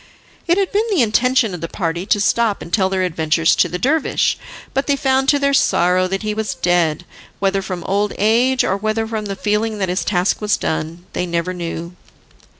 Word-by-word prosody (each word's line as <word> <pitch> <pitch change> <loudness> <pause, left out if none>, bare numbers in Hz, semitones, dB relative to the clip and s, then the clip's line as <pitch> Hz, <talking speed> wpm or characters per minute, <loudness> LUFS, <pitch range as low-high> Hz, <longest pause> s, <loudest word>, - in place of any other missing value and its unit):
It 345 +2 +3
had 390 -2 0
been 425 +3 +1
the 370 - +3
intention 235 0 +2
of 175 - -6
the 165 - -3
party 170 +1 -3
to 205 - +2
stop 215 +1 +1
and 170 - -12
tell 190 -3 +3
their 190 -1 0
adventures 160 -1 +2
to - - +3
the 180 - -3
dervish, 285 - +1 0.4
but 270 - -1
they 285 - +3
found 270 0 +1
to 290 - +4
their 280 0 +1
sorrow 185 -7 +3
that 195 +3 -3
he 215 0 -1
was 215 0 -3
dead, 175 -2 +1 0.3
whether 195 0 0
from 185 -3 -5
old 205 +3 0
age, 240 +5 +3
or 190 - +1
whether 215 +2 -1
from 220 -1 -4
the 200 -1 -4
feeling 210 +2 -1
that 190 -3 -1
his 180 - -1
task 180 +1 0
was 210 0 +1
done, 160 +2 -4
they 180 - -2
never 170 +1 -2
knew. 170 0 -6
200 Hz, 210 wpm, -19 LUFS, 180-230 Hz, 0.4 s, to